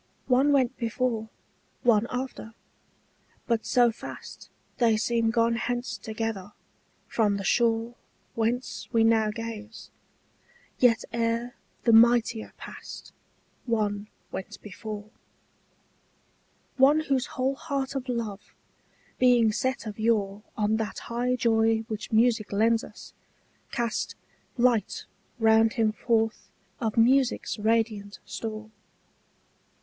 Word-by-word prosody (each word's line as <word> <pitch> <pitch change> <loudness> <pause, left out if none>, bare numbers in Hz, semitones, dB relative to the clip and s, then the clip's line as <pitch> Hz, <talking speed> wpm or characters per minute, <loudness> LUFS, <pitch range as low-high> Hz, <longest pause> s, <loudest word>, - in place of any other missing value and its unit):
One 265 +3 +4
went 260 -3 +2
before, 230 -1 -1 0.5
one 235 -2 +4
after, 250 -3 -5 0.9
but 230 -2 0
so 245 -2 +4
fast 225 - -10 0.3
They 230 -3 +3
seem 230 0 +1
gone 230 0 +2
hence 245 +1 -2
together, 215 -3 -4 0.5
from 210 -3 +1
the 195 - -5
shore 230 +2 +2 0.4
Whence 235 +3 -2
we 230 -2 +3
now 225 -1 +4
gaze: 225 0 -7 0.9
yet 235 -3 +4
ere 235 +1 -1 0.3
the 230 - +4
mightier 230 0 +4
passed - - -10 0.5
One 210 -3 0 0.2
went 190 - -6
before; 210 +1 -7 1.7
One 285 +4 +5
whose 270 -4 0
whole 260 +1 +1
heart 275 -1 -3
of 265 -1 -4
love, 220 -4 -4 0.6
being 245 -3 +5
set 260 +3 -2
of 215 -1 -7
yore 210 -3 +1 0.2
On 215 0 +2
that 220 -1 -3
high 245 +2 -1
joy 225 -2 +2
which 220 -1 -6
music 225 -1 +3
lends 225 +3 +3
us, - - -12 0.6
cast 235 -2 -2 0.4
Light 240 -4 +1 0.3
round 225 0 +4
him 225 -3 +2
forth 225 0 0 0.3
of 225 -1 -2
music's 250 0 +3
radiant 215 -2 0
store. 220 -1 -6
230 Hz, 110 wpm, -27 LUFS, 220-245 Hz, 1.7 s, One